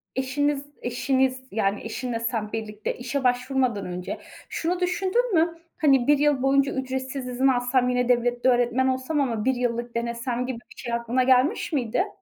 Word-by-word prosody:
eşiniz 280 +2 0 0.2
eşiniz, 260 +1 0
yani, 200 -1 0
eşinle 235 +1 -3
sen 225 -2 -2
birlikte 215 -1 -4
işe 255 +2 -3
başvurmadan 250 -3 +1
önce 180 0 -5 0.3
şunu 350 +2 -1
düşündün 380 +6 0
mü? 330 0 +2 0.2
Hani, 270 -5 +4
1 295 -1 +6
yıl 290 -2 +2
boyunca 275 +1 +3
ücretsiz 260 0 -3
izin 255 +2 +1
alsam, 250 0 +2
yine 250 0 +1
devlette 245 +1 +2
öğretmen 245 +1 +2
olsam 260 +3 0
ama 230 -5 -1
1 265 - +3
yıllık 240 -1 -2
denesem 235 +1 -2
gibi 255 -2 -4
bir 240 +6 -19
şey 240 -2 -4
aklına 235 +2 +1
gelmiş 260 +5 +2
miydi? 270 - 0
255 Hz, 160 wpm, -25 LUFS, 240-270 Hz, 0.3 s, 1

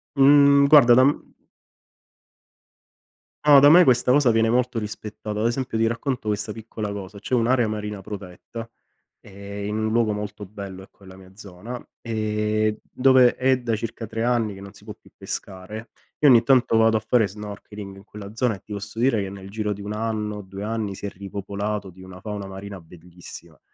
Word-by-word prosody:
mh 140 0 +6
guarda 130 -5 +7
da 130 - +6
m 140 - +5 2.4
No, 145 -2 +9
da 145 - +7
me 175 +4 +8
questa 125 -4 +3
cosa 135 -3 +4
viene 115 0 +2
molto 125 0 +1
rispettata. 105 0 -6
Ad 110 - 0
esempio, 120 -1 -1
ti 115 - +2
racconto 115 -1 -2
questa 105 +1 -2
piccola 110 -1 -6
cosa: 100 0 -8
c'è 125 +5 -2
un'area 120 0 +2
marina 105 -2 -5
protetta, 100 +4 -9 0.5
eh, 100 0 -9
in 105 +1 -3
un 110 0 -1
luogo 115 -2 +2
molto 105 0 -6
bello, 100 -2 -9
ecco, 100 +1 -18
nella 95 0 -13
mia 95 0 -16
zona 105 +4 -9 0.2
e 110 -1 -1
dove 130 -1 +5
è 130 0 +2
da 115 -2 -1
circa 115 0 -6
3 115 +1 -3
anni 115 -4 0
che 95 - -11
non 100 +1 -11
si 100 - -18
può 105 0 -8
più - - -22
pescare. 105 +4 -7 0.3
Io 145 - +6
ogni 120 -3 +7
tanto 120 -3 +3
vado 110 0 +4
a - - 0
fare 110 -2 +3
snorkeling 105 0 -9
in 95 - -14
quella 105 -1 -10
zona 115 -1 0
e 95 - -15
ti 105 - -9
posso 100 +2 -7
dire 115 -3 +2
che 95 - -4
nel 95 0 -10
giro 105 -1 -2
di 100 - -10
1 105 +1 -5
anno, 105 -1 -3
2 95 +1 -9
anni 110 -3 -3
si - - -8
è 100 - -2
ripopolato 100 +1 -5
di 95 +1 -16
una 95 0 -11
fauna 105 -1 -6
marina 95 -1 -9
bellissima. 85 -1 -13
105 Hz, 190 wpm, -23 LUFS, 100-115 Hz, 2.4 s, No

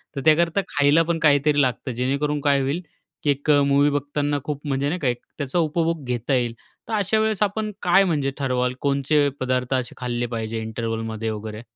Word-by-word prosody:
तर 135 - -3
त्याकरता 165 +4 +4
खायला 145 +2 +3
पण 165 0 -1
काहीतरी 145 -1 +4
लागतं. 130 0 -1
जेणेकरून 140 +5 -1
काय 140 -1 +3
होईल 140 +6 -1 0.4
की 150 - +1
एक 140 +2 -3 0.2
मूवी 140 +1 +4
बघताना 145 0 -1
खूप 145 -2 -4
म्हणजे 140 0 0
नाही 180 +4 -2
का, 140 - -1
एक 120 -1 -1 0.2
त्याचा 145 +3 -1
उपभोग 165 0 0
घेता 125 +2 -2
येईल, 120 -3 +1 0.3
तर 230 - -5
अशावेळेस 215 0 +1
आपण 215 +1 -1
काय 180 +2 +5
म्हणजे 150 -7 0
ठरवाल, 125 -2 0
कोणचे 145 +1 +2
पदार्थ 130 0 -1
असे 130 -2 -1
खाल्ले 120 -1 -2
पाहिजे 110 0 -3
इंटरव्हलमध्ये 110 0 -3
वगैरे? 110 0 -6
140 Hz, 180 wpm, -23 LUFS, 125-155 Hz, 0.4 s, काय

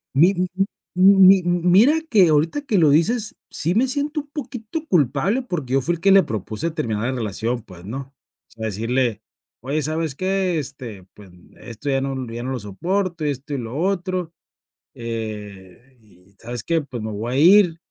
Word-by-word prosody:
Mi 170 +7 +6
m 180 -1 -1 0.5
m 195 +2 +6
mi 190 0 +8
mira 180 - +4
que 200 - +5
ahorita 155 - +1
que 250 -9 0
lo 155 -4 +5
dices 215 +9 +1
sí, 170 +3 -1
me 245 +6 +2
siento 290 +3 -1
un 290 - -20
poquito 280 0 -6
culpable 165 - +1
porque 160 - -4
yo 135 - +3
fui 175 +6 0
el 165 - -11
que 195 - +4
le 195 0 +8
propuse 110 - -4
terminar 115 -10 -3
la 130 - 0
relación, 115 0 -3
pues, 90 -3 -13
¿no?, 135 +6 -7 0.4
o - - -32
sea, 110 -1 -7
decirle: 115 +2 -1 0.4
"Oye, 140 +5 -2
¿sabes 155 0 -1
qué?, 185 +1 0
este, 125 -9 -7
pues, 100 -4 -15 0.3
esto 120 +4 -6
ya 135 -1 +2
no 135 -2 -3
ya 120 +1 -5
no 130 - -3
lo 130 - -3
soporto, 170 - -2
y 145 - +1
esto 140 +2 -6
y - - -2
lo 120 0 -6
otro, 180 0 -1 0.6
eh, 110 0 -7
y 100 -2 -22
¿sabes 120 0 -6
qué?, 165 -1 +1
pues, 130 -4 -7
me 110 0 -5
voy 110 +4 -4
a - - 0
ir", 175 +1 +6
145 Hz, 190 wpm, -21 LUFS, 115-185 Hz, 0.6 s, mi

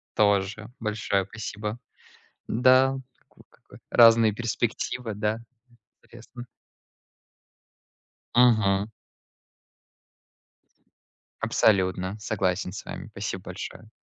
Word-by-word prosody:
Тоже, 105 +1 +1
большое 105 -3 -1
спасибо! 105 +1 -6 0.7
Да, 130 +3 +4 0.4
ну - - -18
как - - -28
вот - - -14
разные 115 -2 +6
перспективы, 120 0 -3
да. 105 +2 -1 0.6
Интересно. 120 +1 -12 1.9
Мгм. 110 -5 +4 2.6
Абсолютно. 95 -1 +1
Согласен 95 -3 -1
с 100 - -8
вами. - - -7
Спасибо 100 -2 -5
большое. 110 - -8
110 Hz, 75 wpm, -26 LUFS, 100-115 Hz, 2.6 s, разные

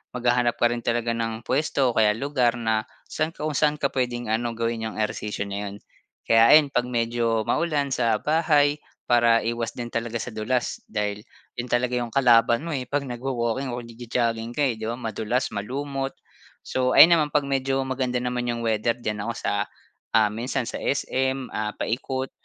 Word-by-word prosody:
maghahanap 120 -1 +2
ka 120 0 +3
rin 120 - -4
talaga 120 0 0
ng 115 -1 -3
puwesto 135 -1 +1
o - - -9
kaya 105 -1 +4
lugar 125 -3 +1
na 110 -1 0 0.2
saan 155 +1 -2
ka - - -7
kung 155 - -1
saan 150 -1 +3
ka 140 -2 -1
puwedeng 120 -3 -2
ano, 115 +1 -1
gawin 115 0 -1
yung - - -10
ehersisyo 105 -1 -2
na 100 0 -4
'yon. 100 - -9 0.5
Kaya 115 0 +6
ayon 145 -3 +4
'pag 125 0 +1
medyo 115 -1 0
maulan, 145 -5 0
sa 115 -4 +2
bahay 150 +1 +2 0.3
para 120 -1 +4
iwas 115 0 -1
din 120 - -3
talaga 115 0 -2
sa 125 - -5
dulas 120 +3 -1
dahil 105 -1 -2 0.4
'yon 120 - -3
talaga 125 0 +1
yung 120 -1 -3
kalaban 120 -1 +4
mo, 170 - -4
eh, 130 -3 -3
'pag 145 +1 0
nagwa-walking 125 0 -2
o 120 - -5
nagjo-jogging 115 0 -2
ka 145 - +1
eh, 120 -4 0
'di 110 - -4
ba 120 - -2
madulas, 115 +2 -2
malumot. 135 +5 -4 0.5
So, 130 0 0
ayon 170 +2 +9
naman 150 - +1
'pag 145 -1 +1
medyo 135 0 0
maganda 130 -1 -1
naman 125 0 -2
yung 120 0 -2
weather, 110 +1 +1
diyan 110 -3 -3
ako 115 - -1
sa, - - -1 0.6
ah 110 -2 +4
minsan 125 +4 -2
sa - - -5
SM, 130 -1 -1
ah, 105 0 -3
paikot. 130 +2 -2
120 Hz, 185 wpm, -24 LUFS, 115-135 Hz, 0.6 s, ayon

